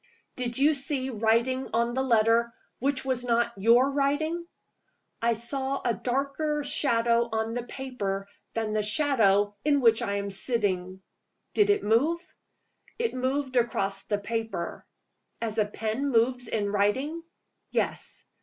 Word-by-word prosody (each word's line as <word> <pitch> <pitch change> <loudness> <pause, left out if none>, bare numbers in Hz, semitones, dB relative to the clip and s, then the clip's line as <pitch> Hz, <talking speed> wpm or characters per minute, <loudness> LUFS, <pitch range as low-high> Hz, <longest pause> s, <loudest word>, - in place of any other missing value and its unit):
"Did 245 -1 -3
you 290 +3 +4
see 275 -1 -2
writing 230 +4 +1
on 235 +1 +1
the 260 - 0
letter, 230 -1 +2 0.2
which 270 +1 0
was 255 -2 0
not 235 -1 +1
your 235 +7 +4
writing?" 310 +5 0 0.7
"I 235 0 +3
saw 265 +4 -1
a 240 - +2
darker 280 +5 -1
shadow 235 -4 +2
on 220 0 -1
the 245 - -2
paper 205 -8 -4 0.3
than 225 -2 -1
the 215 0 +1
shadow 210 -4 +2
in 290 -1 +3
which 230 -2 +4
I 200 -4 -1
am 200 0 -3
sitting." 190 -4 0 0.5
"Did 415 -1 +3
it 410 0 +3
move?" 280 +11 +2 0.8
"It 465 -1 -1
moved 260 +1 -1
across 200 -5 0
the 205 - 0
paper." 220 -4 -4 0.5
"As 225 -1 -2
a 210 - +3
pen 220 +6 -2
moves 245 0 +2
in 205 -3 -1
writing?" 260 +11 0 0.5
"Yes. - - 0
235 Hz, 140 wpm, -27 LUFS, 220-275 Hz, 0.8 s, you